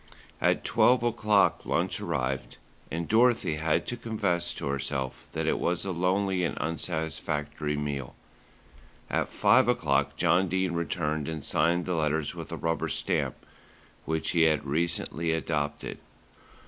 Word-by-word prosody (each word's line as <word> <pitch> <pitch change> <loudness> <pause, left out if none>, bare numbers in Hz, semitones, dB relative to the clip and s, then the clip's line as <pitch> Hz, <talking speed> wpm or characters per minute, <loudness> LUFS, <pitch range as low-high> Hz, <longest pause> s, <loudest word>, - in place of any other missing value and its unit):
At - - +2
twelve 125 -1 +4
o'clock 110 -4 +2
lunch - - 0
arrived, 65 +1 -2 0.3
and 85 +1 -3
Dorothy 115 -8 +3
had 75 0 +1
to 120 - -3
confess 100 -7 -1
to - - -5
herself 70 -1 -3
that - - -2
it - - +1
was 90 +2 0
a 95 - -1
lonely 95 +1 +1
and 85 - -1
unsatisfactory 75 -2 -2
meal. 70 -3 -4 1.0
At - - 0
five 130 +1 +4
o'clock 70 - +1
John 95 +2 +3
Dene 95 0 0
returned 80 -3 -1
and 80 -3 -4
signed 85 +2 +2
the 90 - -1
letters 75 -2 0
with - - -8
a - - -4
rubber 80 0 -1
stamp, - - -1 0.6
which 80 0 0
he 85 -2 +4
had 75 -2 +2
recently 85 +2 -1
adopted. 75 -3 -2
80 Hz, 140 wpm, -28 LUFS, 75-90 Hz, 1.0 s, twelve